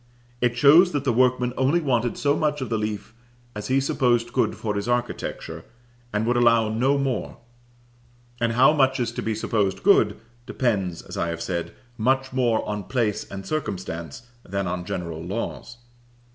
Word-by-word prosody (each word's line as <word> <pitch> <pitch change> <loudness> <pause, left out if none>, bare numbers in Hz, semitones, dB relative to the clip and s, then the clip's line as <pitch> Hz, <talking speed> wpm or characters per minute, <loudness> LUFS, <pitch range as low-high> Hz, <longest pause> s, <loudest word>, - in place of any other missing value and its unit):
It 120 0 +1
shows 155 +7 +6
that 145 -2 -1
the 130 -4 +1
workman 125 0 +2
only 135 +6 +2
wanted 120 -6 0
so 145 0 +2
much 150 -1 0
of 130 - -4
the 115 - 0
leaf 105 0 -4 0.4
as 105 -1 -6
he 130 +1 +3
supposed 125 -3 +1
good - - +1
for 105 -2 -3
his 100 +2 -3
architecture, 120 0 -3 0.5
and 105 +1 0
would 120 +1 +1
allow 115 -2 +4
no 130 +6 +2
more; 135 -5 -2 1.0
and 115 -1 +1
how 130 +6 +5
much 135 -3 +2
is 120 -2 -1
to - - -5
be 110 -1 -2
supposed 105 -3 -1
good, 110 - +4 0.3
depends, 95 -9 -1
as - - -9
I 85 - 0
have 85 0 -4
said, 85 -2 -4 0.2
much 130 +3 +1
more 120 -4 +1
on 105 -2 -3
place 115 -4 -1
and 95 0 -7
circumstance 95 - -4 0.2
than 100 +1 -3
on 90 0 -3
general 85 -3 -4
laws. 115 +5 -5
120 Hz, 175 wpm, -24 LUFS, 105-130 Hz, 1.0 s, shows